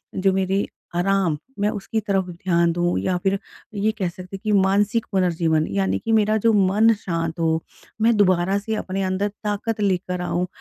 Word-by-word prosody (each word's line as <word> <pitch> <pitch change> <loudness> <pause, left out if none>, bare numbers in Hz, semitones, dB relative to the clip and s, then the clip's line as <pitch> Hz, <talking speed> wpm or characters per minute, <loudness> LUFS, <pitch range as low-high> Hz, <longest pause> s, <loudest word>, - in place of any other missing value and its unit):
जो 190 0 +2
मेरी 190 +1 0 0.3
आराम 180 -3 +1 0.2
मैं 205 +1 +2
उसकी 215 +1 -3
तरफ़ 200 -3 0
ध्यान 170 -1 +1
दूँ 175 +1 0
या 185 -1 0
फ़िर 195 0 +2 0.4
ये 205 +2 +1
कह 185 -3 0
सकती 185 +2 -9
हैं - - -19
कि 215 - 0
मानसिक 205 +4 +2
पुनर्जीवन 165 -4 +1
यानी 95 -1 0
कि 225 - 0
मेरा 215 -1 +3
जो 230 - +6
मन 205 +3 +4
शांत 165 -1 -2
हो 160 -1 +1 0.4
मैं 230 +1 +4
दोबारा 185 -1 +3
से 220 +2 -3
अपने 195 -2 -3
अंदर 190 +2 0 0.2
ताकत 210 +1 -2
लेकर 180 -2 0
आऊँ 180 0 -1
190 Hz, 180 wpm, -22 LUFS, 175-205 Hz, 0.4 s, जो